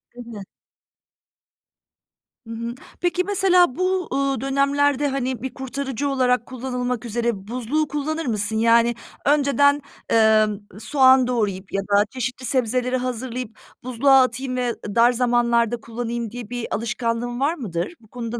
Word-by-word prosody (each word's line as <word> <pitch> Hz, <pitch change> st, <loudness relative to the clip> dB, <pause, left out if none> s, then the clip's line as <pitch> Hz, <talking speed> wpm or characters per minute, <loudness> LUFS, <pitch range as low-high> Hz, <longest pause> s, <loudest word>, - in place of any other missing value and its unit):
Değil 245 Hz, -1 st, -10 dB
mi? 220 Hz, -4 st, -8 dB, 2.1 s
Hı 230 Hz, -, -6 dB
hı, 235 Hz, +1 st, -5 dB, 0.3 s
peki 355 Hz, +1 st, +1 dB
mesela 365 Hz, -7 st, +3 dB
bu, 370 Hz, 0 st, -1 dB
ııı, 275 Hz, -2 st, 0 dB
dönemlerde, 280 Hz, +1 st, +1 dB
hani, 260 Hz, -3 st, -2 dB
bir 265 Hz, 0 st, -5 dB
kurtarıcı 270 Hz, 0 st, -3 dB
olarak 250 Hz, -3 st, +1 dB
kullanılmak 250 Hz, -2 st, -4 dB
üzere 230 Hz, -3 st, -2 dB
buzluğu 255 Hz, +6 st, -1 dB
kullanır 305 Hz, +3 st, -3 dB
mısın? 215 Hz, -3 st, 0 dB
Yani, 230 Hz, +1 st, +4 dB, 0.3 s
önceden, 285 Hz, 0 st, +3 dB, 0.3 s
ımm, 215 Hz, -2 st, +3 dB
soğan 260 Hz, +2 st, +4 dB
doğrayıp 205 Hz, -6 st, -2 dB
ya 195 Hz, -, 0 dB
da 200 Hz, +1 st, +2 dB
çeşitli 250 Hz, 0 st, -4 dB
sebzeleri 250 Hz, 0 st, 0 dB
hazırlayıp 250 Hz, -2 st, -4 dB, 0.3 s
buzluğa 260 Hz, +2 st, +4 dB
atayım 255 Hz, +1 st, -1 dB
ve 245 Hz, -1 st, -1 dB, 0.2 s
dar 235 Hz, +1 st, +6 dB
zamanlarda 240 Hz, -1 st, +2 dB
kullanayım 235 Hz, 0 st, -4 dB
diye 240 Hz, -2 st, -8 dB
bir 245 Hz, -1 st, -4 dB
alışkanlığın 235 Hz, +2 st, -2 dB
var 285 Hz, +4 st, +2 dB
mıdır? 190 Hz, -, -4 dB
Bu 220 Hz, -, -21 dB
konuda 235 Hz, 0 st, -5 dB
245 Hz, 135 wpm, -22 LUFS, 230-270 Hz, 2.1 s, dar